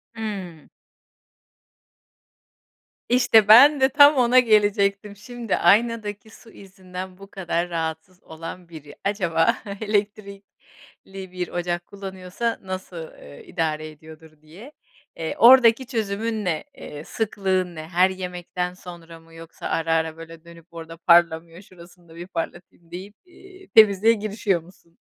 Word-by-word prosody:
Hımm. 195 -8 -7 2.4
İşte 230 -4 +4
ben 275 +6 +8
de 265 - +4
tam 285 +2 +6
ona 250 -1 +4
gelecektim. 205 -3 +1
Şimdi, 235 +1 -4
aynadaki 215 +2 +1
su 225 +1 -17
izinden 185 -1 -10
bu 195 +1 -13
kadar 175 -3 -3
rahatsız 165 +2 -5
olan 165 +2 -10
biri 150 -3 -12
acaba 195 +1 0 0.2
elektrikli 200 -2 -6
bir 180 -1 -4
ocak 175 0 -3
kullanıyorsa 195 +3 -5
nasıl, 185 -3 -8
eee, 70 0 -13
idare 155 -3 -3
ediyordur 155 0 -16
diye. 180 - -14 0.4
Eee, 160 -1 -5
oradaki 240 0 +6
çözümün 220 -2 -3
ne? 160 -4 -2
Eee, 150 0 -9
sıklığın 190 -4 -2
ne? 155 - -7
Her 180 +2 +3
yemekten 180 -1 -5
sonra 170 -2 -12
mı 165 0 -21
yoksa 165 0 -9
ara 165 0 -1
ara 160 0 -1
böyle, 165 0 -12
dönüp 170 -1 -15
orada 165 0 -10
parlamıyor 170 0 +2
şurasını 175 -2 -18
da 165 - -15
bir 175 +1 -9
parlatayım 175 -1 -8
deyip, 190 +4 -9
eee, 375 +1 -17
temizliğe 215 0 +6
girişiyor 210 -4 -2
musun? 170 -1 -22
185 Hz, 125 wpm, -23 LUFS, 165-210 Hz, 2.4 s, ben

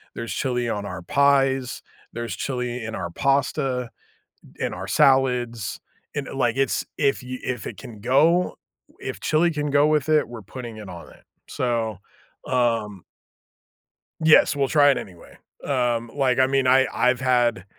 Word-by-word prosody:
there's 115 0 -5
chili 125 -2 -1
on 105 -3 -3
our 90 -2 -6
pies, 135 +3 +2 0.3
there's 120 0 -4
chili 125 -2 -3
in 115 0 -5
our 85 - -4
pasta, 135 - 0 0.7
in - - -1
our - - -6
salads, 125 -6 +2 0.4
and, 145 -2 -3
i - - -8
like, 125 -2 0
it's 135 - 0
if 140 -3 +1
you 130 0 -6
if 125 -1 -4
it - - -8
can 110 -3 -11
go, 155 +9 +3 0.4
if - - -6
chili 160 +3 +2
can 150 -1 -2
go 145 +1 +4
with 155 -1 +1
it, 155 -1 +3
we're 120 -2 -8
putting 120 +1 -8
it 105 -3 -9
on 85 -2 -10
it. - - -19 0.2
So, 115 -4 -2 0.5
um 115 -6 0 1.2
Yes, 160 -1 +6
we'll 140 -2 0
try 145 -2 +5
it 135 - +1
anyway. 90 -3 -12 0.3
Um, 120 -4 0
like, 130 -3 +1
I 130 - +5
mean, 135 0 +1
I 130 +1 +5
I've 125 0 +2
had, 120 -6 +2
125 Hz, 160 wpm, -23 LUFS, 115-140 Hz, 1.2 s, Yes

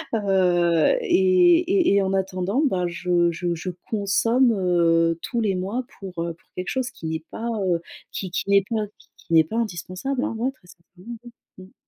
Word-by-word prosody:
heu, 180 - +2
et 365 -3 +4
et 360 - +2
et 200 - +4
en 190 0 -1
attendant, 190 +5 -1
ben, 180 -7 0
je 175 0 +1
je 170 +1 -2
je 170 +3 -5 0.2
consomme, 230 +4 +2
heu, 170 -3 +2
tous 235 -2 -2
les 205 -4 0
mois 200 +8 -3
pour, 185 -4 -6
heu, 170 0 -3
pour - - -34
quelque 180 +1 -4
chose 260 -1 -2
qui 160 0 -5
est 160 - -17
pas, 230 - -5 0.2
heu, 170 -2 +1 0.3
qui 190 - -5
qui 185 - -3
n'est 200 0 +5
pas, 220 -2 -1
qui - - -23
qui 170 - -8
n'est 160 -1 +7
pas 220 +8 -5
indispensable, 220 +5 -3
hein, 305 - -2
ouais, 250 +4 -1
très 255 -9 -26
sincérement, 185 +7 -12
ouais. 240 - -12 0.3
Mmh. 190 - -21
190 Hz, 195 wpm, -23 LUFS, 175-235 Hz, 0.3 s, n'est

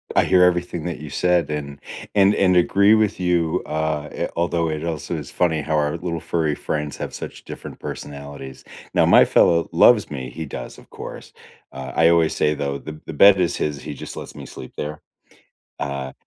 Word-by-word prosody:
I - - +5
hear 90 - +4
everything 90 -2 +1
that 85 -3 -4
you 75 - -8
said, 85 0 +1
and 70 -1 -5 0.4
and 100 0 +5
and 90 -3 +3
agree 100 +4 +5
with 110 -3 +1
you, 85 -3 +1
uh, 75 -1 -2
i - - -3
although 85 -1 0
it 80 0 -3
also 85 0 -3
is 75 -4 -6
funny 80 -3 +1
how 80 +2 -1
our 75 +2 0
little 85 -1 -3
furry 80 -2 -1
friends 75 0 -4
have - - -5
such - - -8
different - - -9
personalities. 70 -2 -8 0.3
Now, - - +5
my - - +7
fellow 85 -1 +3
loves 100 +3 +5
me, 65 -4 -6
he 80 +6 -6
does, 60 -4 -8
of - - -19
course, - - -9 0.4
uh, 65 -1 -7
I 80 0 +5
always 85 -2 +3
say, 75 - +1
though, 70 -1 -3
"The 75 +1 -9
the 80 - -6
bed 100 +5 +7
is 90 -2 +1
his, 75 -2 -2
he 75 - -5
just - - -9
lets - - -8
me - - -10
sleep 65 - -10
there." 75 0 -5 0.8
Uh, 70 -1 -4
80 Hz, 200 wpm, -22 LUFS, 75-85 Hz, 0.8 s, my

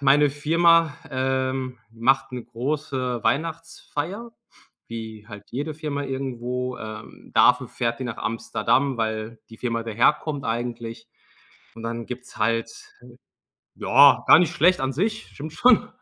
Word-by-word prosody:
meine 140 +1 +5
Firma, 165 +1 +3 0.2
ähm, 130 -1 -1
macht 130 +3 +1
'ne 125 -2 -5
große 130 -1 -3
Weihnachtsfeier, 165 - -3 0.6
wie 110 -2 -7
halt 105 -1 -11
jede 145 +5 -3
Firma 150 -2 -3
irgendwo. 125 -2 -3
Ähm, 110 0 -10
dafür - - +5
fährt 115 0 -2
die - - -3
nach 120 -3 -4
Amsterdam, 115 +4 0
weil 110 0 -3
die 115 - -12
Firma 115 -2 -2
daherkommt 140 +6 +1
eigentlich. 115 0 -4 0.7
Und 115 - -10
dann 115 0 -4
gibt's 125 0 -9
halt 115 +1 0 1.0
ja, - - +6
gar - - +9
nicht 175 - +2
schlecht 180 +4 +4
an 135 - 0
sich, 215 +8 -1
stimmt 150 +2 -9
schon. 245 +3 +4
130 Hz, 130 wpm, -24 LUFS, 115-150 Hz, 1.0 s, gar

